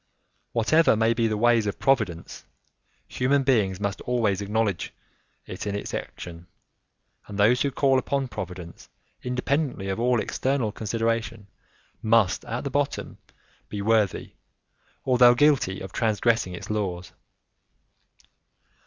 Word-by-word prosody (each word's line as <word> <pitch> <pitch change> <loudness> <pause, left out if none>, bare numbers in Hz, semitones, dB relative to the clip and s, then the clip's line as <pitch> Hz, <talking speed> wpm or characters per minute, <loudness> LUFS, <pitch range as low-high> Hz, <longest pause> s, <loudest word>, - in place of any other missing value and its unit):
Whatever 140 +6 +4
may 110 +1 +2
be 115 0 +1
the 110 -1 -1
ways 115 -1 +3
of 100 - -3
Providence, 110 -12 -1 0.6
human 135 +2 +1
beings 105 -8 +1
must 100 -2 -3
always 110 -6 0
acknowledge 105 -2 -1 0.5
it - - -6
in 100 - -2
its 100 - -5
action, 85 0 -7 0.8
and 100 - -7
those 110 +5 +4
who 140 - +2
call 135 -1 +2
upon 135 +1 -2
Providence 90 -5 -8 0.3
independently 125 -4 -2
of 95 - -2
all 120 0 +2
external 130 -1 -1
consideration 115 -1 -2 0.6
must, 110 -4 +2
at 120 +2 -4
the 140 - -4
bottom, 145 +1 -2 0.5
be 105 - -5
worthy, 105 -1 +1 0.7
although 125 -1 +6
guilty 130 -9 +2
of 95 - -7
transgressing 110 -3 0
its 90 - -7
laws. 90 -5 -3
115 Hz, 125 wpm, -25 LUFS, 100-125 Hz, 0.8 s, although